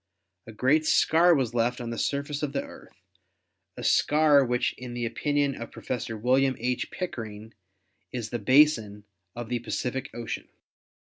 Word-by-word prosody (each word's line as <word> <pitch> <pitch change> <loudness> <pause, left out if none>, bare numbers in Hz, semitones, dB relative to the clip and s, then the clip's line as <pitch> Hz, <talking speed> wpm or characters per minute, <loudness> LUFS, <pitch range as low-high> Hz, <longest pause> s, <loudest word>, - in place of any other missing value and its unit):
A - - -8
great 140 +8 +2
scar 170 +2 +5
was 125 -5 -1
left 120 +1 0
on 120 -1 -5
the 115 - -5
surface 140 +1 -2
of 145 -2 -3
the 140 - -1
Earth, - - -15 0.7
a - - -7
scar 150 -2 +4
which 125 -1 0
in 125 -1 -7
the 120 -1 -2
opinion 145 +4 0
of 115 -2 -7
Professor 115 -2 -5
William 130 +4 +2
H. 125 +1 -2
Pickering 110 - -6 0.6
is 120 -3 -5
the 120 - -2
basin 110 -4 +3 0.3
of 120 -1 -6
the 120 -1 -1
Pacific 130 +3 -3
Ocean. 120 -1 -6
125 Hz, 155 wpm, -27 LUFS, 115-140 Hz, 0.7 s, scar